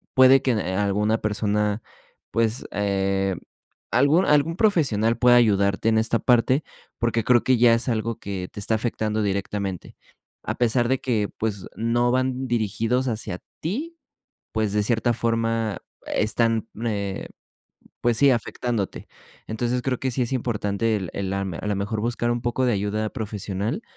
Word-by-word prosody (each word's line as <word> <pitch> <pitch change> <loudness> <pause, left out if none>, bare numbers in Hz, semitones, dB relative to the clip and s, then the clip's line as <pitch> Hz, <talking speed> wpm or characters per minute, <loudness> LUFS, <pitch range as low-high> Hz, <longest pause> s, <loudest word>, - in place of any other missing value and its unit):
puede 130 +1 +7
que 130 - +1
n 105 -4 -1
alguna 105 +3 +1
persona 105 0 0 0.5
pues, 115 +1 0
eh, 95 -1 0 0.6
algún 145 +9 +4
algún 150 +3 +3
profesional 135 - +2
pueda 125 -1 +6
ayudarte 100 -2 +3
en 110 0 +3
esta 115 +1 +1
parte. 130 +3 +3 0.3
Porque 115 -1 0
creo 120 -1 +4
que 130 -1 +3
ya 120 -1 +6
es 115 +2 -2
algo 115 0 -1
que 95 -3 -5
te - - -8
está 105 +2 -1
afectando 110 -1 -1
directamente. 100 -2 -3 0.5
A - - -3
pesar 120 0 +2
de 130 0 +1
que, 110 -5 0
pues, 105 -4 -3
no 120 +2 +1
van 130 0 0
dirigidos 115 +2 0
hacia 110 -6 -3 0.2
ti, 295 - -4 0.6
pues, 110 -2 0
de 105 0 +2
cierta 120 +2 +1
forma 115 -3 -1 0.3
están, 115 +1 0 0.2
eh, 100 -3 -3 0.7
pues 120 -1 +2
sí, 140 -1 +6
afectándote. 115 -2 -2 0.4
Entonces, 120 +3 -1
creo 130 -1 -1
que 130 - -1
sí 125 - 0
es 120 - -3
importante 115 -3 0
el 95 -4 -4
el 95 -1 -3
am 95 -2 -2
a - - -6
lo 105 - 0
mejor 105 +2 -2
buscar 120 +1 -1
un 120 0 -1
poco 120 +2 0
de 125 - +2
ayuda 105 +2 -1
profesional 105 - -3
115 Hz, 160 wpm, -24 LUFS, 105-120 Hz, 0.7 s, puede